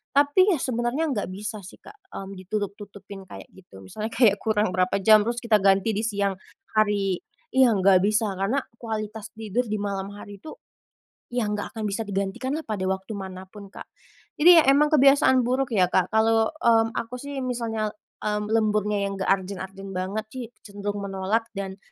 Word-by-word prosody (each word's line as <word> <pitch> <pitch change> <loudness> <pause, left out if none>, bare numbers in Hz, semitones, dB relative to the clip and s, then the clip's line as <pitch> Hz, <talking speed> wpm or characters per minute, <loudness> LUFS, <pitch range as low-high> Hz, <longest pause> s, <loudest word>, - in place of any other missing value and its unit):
Tapi 290 +7 +4
ya - - +3
sebenarnya 255 +5 -1
enggak 210 -6 -2
bisa 210 +3 -6
sih 195 +1 -12
Kak, 420 0 -16 0.2
mmm, 195 -1 -7
ditutup-tutupin 200 0 -6
kayak - - -11
gitu, 100 - -15
misalnya 210 - -5
kayak 220 -5 +4
kurang 215 -3 0
berapa 185 0 +1
jam 215 +1 +6
terus 240 +1 -2
kita 220 -3 +3
ganti 195 +2 +3
di 215 +1 -2
siang 200 -3 -1 0.3
hari 205 -4 +1 0.3
iya, 260 -1 +5
enggak 190 -1 +5
bisa 215 +1 +1
karena 240 +8 0 0.2
kualitas 215 -2 -5
tidur 220 +2 -2
di 215 - -2
malam 200 -2 -3
hari 205 -1 -10
itu, 310 - -10 0.7
ya 245 -2 -1
enggak 210 0 -3
akan 220 -2 -4
bisa 200 +3 -3
digantikan 205 +7 -2
lah 320 - -7
pada 215 -3 -4
waktu 190 +3 -3
manapun 190 +1 -9
Kak. - - -10 0.6
Jadi 345 +2 +9
ya - - -1
emang 300 +2 +4
kebiasaan 275 -2 +5
buruk 255 +2 0
ya 185 -4 +4
Kak, 185 - +1
kalau, 225 0 +3
mmm, 230 -7 +2
aku 235 +2 -4
sih 285 0 -6
misalnya, 225 -4 -2 0.3
mmm, 210 0 -1
lemburnya 210 -2 +1
yang 200 - -3
enggak 190 - -1
urgent-urgent 195 0 -6
banget 190 +4 -3
sih, 255 -2 -5 0.2
cenderung 205 0 -5
menolak 195 +4 -1
dan 195 -1 -5
210 Hz, 175 wpm, -25 LUFS, 195-230 Hz, 0.7 s, Jadi